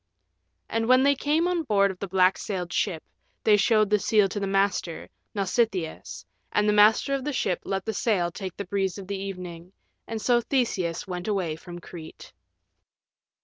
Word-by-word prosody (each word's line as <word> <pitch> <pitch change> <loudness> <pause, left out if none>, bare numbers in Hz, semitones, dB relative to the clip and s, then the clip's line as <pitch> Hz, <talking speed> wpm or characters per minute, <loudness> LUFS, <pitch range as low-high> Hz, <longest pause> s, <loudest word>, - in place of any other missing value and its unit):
And 225 0 -1
when 255 +1 +5
they 280 +1 +5
came 300 +5 +1
on 360 -2 0
board 200 -8 +2
of 185 - -12
the 200 - -4
black 185 0 +3
sailed 180 -4 -4
ship 175 -6 -1 0.4
they 215 - +6
showed 215 0 +3
the 210 - +4
seal 210 -1 +3
to 205 - -3
the 200 - -2
master, 195 -3 0 0.3
Nausitheus, 195 -4 -1 0.3
and 210 0 +2
the 210 - +4
master 215 +6 +5
of 275 -1 -1
the 295 - -2
ship 190 -9 -1
let 195 -1 -2
the 220 - -2
sail 195 -5 0
take 190 -1 -7
the 200 - -4
breeze 195 0 -1
of 195 - -8
the 195 0 -4
evening, 180 -2 -7 0.3
and 225 -1 -4
so 240 +2 +3
Theseus 225 -10 -1
went 180 0 -5
away 185 -7 -1
from 175 +2 -10
Crete. 165 -2 -11
200 Hz, 185 wpm, -26 LUFS, 180-225 Hz, 0.4 s, they